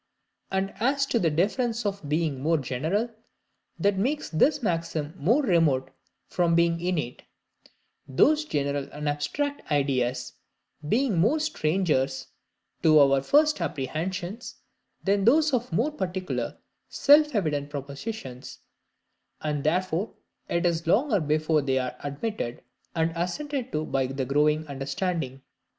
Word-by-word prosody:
And 190 0 -1
as 275 +4 +2
to 240 - 0
the 170 - +2
difference 220 - 0
of 200 -7 -3
being 155 -3 0
more 165 +3 +2
general, 160 - -1 0.7
that 200 -1 +1
makes 275 +9 -1
this 275 - +2
maxim 165 -5 -2
more 225 - +2
remote 155 - +2 0.4
from 170 -2 +1
being 170 0 +3
innate; 170 -9 -2 0.9
those 300 - +3
general 140 - -2
and 150 0 -4
abstract 155 - -2
ideas 130 -3 0 0.6
being 230 -4 +2
more 235 - +3
strangers 155 - 0 0.5
to 155 -1 +6
our 135 -1 +5
first 300 - +3
apprehensions 175 - -4 0.5
than 200 0 +2
those 295 +6 +4
of 245 -3 0
more 235 - +1
particular 185 -8 -3 0.3
self 295 -1 +5
evident 150 -7 0
propositions; 140 - -7 0.8
and 150 -2 -2
therefore 180 +4 0 0.3
it 170 +1 0
is 170 -1 0
longer 215 - +3
before 155 0 +1
they 135 -1 0
are 125 -1 -2
admitted, 145 - -4 0.3
and 165 0 +1
assented 260 - -3
to 155 +1 -1
by 135 -3 0
the 135 0 -3
growing 150 +3 +2
understanding. 140 0 -3
165 Hz, 125 wpm, -26 LUFS, 145-220 Hz, 0.9 s, to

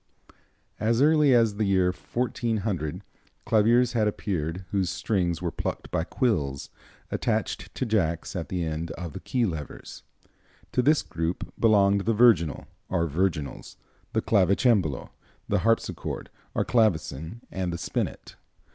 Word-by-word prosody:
As 115 +2 +2
early 150 0 +5
as 115 -4 +3
the 110 - +1
year 95 -2 +3
1400 110 -6 -2 0.4
claviers 115 +3 +4
had 110 -3 +2
appeared 90 -3 -3
whose 95 -3 +1
strings 90 -4 -1
were 85 - -1
plucked - - -4
by 90 -2 0
quills 80 - -1 0.4
attached - - -1
to - - -1
jacks 90 -7 0
at 85 -3 -4
the 90 -2 -1
end 80 +1 -3
of 85 -3 -7
the - - -6
key 115 +7 0
levers. 80 -7 -6 0.7
To 125 - +2
this 150 +4 +3
group 80 +2 -4
belonged 100 -3 +4
the 115 - +3
virginal, 105 -10 +4 0.2
or 85 - +1
virginals, 80 -2 -2 0.4
the - - +1
clavicembalo, 100 - +2 0.4
the 105 - +1
harpsichord, 115 +3 -1 0.2
or - - +1
clavecin, 90 - 0
and 95 -2 -2
the 85 - -3
spinet. - - -4
95 Hz, 135 wpm, -26 LUFS, 85-115 Hz, 0.7 s, early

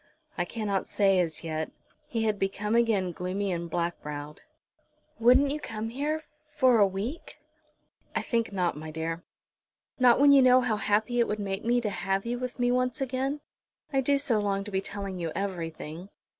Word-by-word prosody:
"I 175 - -1
cannot 205 -1 -2
say 195 -2 +3
as 165 -3 -1
yet." 160 -1 -3 0.4
He 230 -2 -1
had 215 -2 0
become 200 +2 -1
again 220 -6 +2
gloomy 185 +3 -2
and 170 -1 -3
black 170 +1 -2
browed. 150 0 -7 0.8
"Wouldn't 255 +4 +5
you 300 - -2
come 225 -5 -5
here 295 +6 -2 0.3
for 255 -5 +5
a 200 - +6
week?" 205 - -5 0.8
"I - - 0
think 230 -2 0
not, 180 -3 0
my 155 +1 -7
dear." 165 +2 -4 0.8
"Not 250 -1 +6
when 285 0 +7
you 280 -1 +8
know 255 0 +6
how 230 -4 0
happy 215 +4 +1
it 235 - +3
would 210 - -1
make 195 -1 -3
me 240 +2 +2
to 210 -3 -2
have 195 +2 -1
you 240 +1 -2
with 250 -1 -5
me 245 -1 +2
once 250 0 0
again. 270 +2 -2 0.5
I 270 - +3
do 280 +2 +2
so 250 -6 +1
long 200 -1 0
to 210 - -8
be 190 0 0
telling 195 -2 -5
you 165 -2 -2
everything." 170 -2 -5
205 Hz, 185 wpm, -28 LUFS, 180-245 Hz, 0.8 s, you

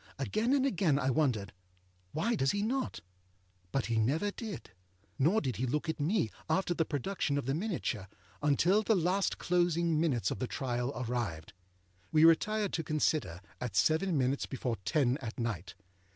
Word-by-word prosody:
Again 215 - 0
and 270 -1 +2
again 175 - +2
I 135 -1 +1
wondered, 120 -8 0 0.6
âWhy 230 +9 +1
does 135 -9 +1
he 205 0 0
not?â 260 +4 -2 0.7
But 135 - 0
he 115 -1 0
never 155 - +1
did. 215 - -7 0.5
Nor 170 +11 +3
did 130 -7 -2
he 130 - -1
look 150 +5 -1
at 160 - -2
me, 155 - +1 0.2
after 175 +2 +1
the 165 -1 0
production 145 0 -1
of 140 - -2
the 135 - 0
miniature, 160 - -2 0.3
until 165 +8 +3
the 220 0 +2
last 185 +2 +1
closing 170 -2 +1
minutes 125 - +1
of - - -4
the 125 - -1
trial 125 -2 -2
arrived. 115 -10 -3 0.6
We 155 +1 +6
retired 205 +5 +3
to 165 - -1
consider, 150 - 0 0.2
at 120 -6 -4
seven 160 - +3
minutes 135 +1 0
before 125 -3 -3
ten 135 -3 +2
at 115 -2 -6
night. 105 -6 -3
150 Hz, 165 wpm, -32 LUFS, 125-180 Hz, 0.7 s, We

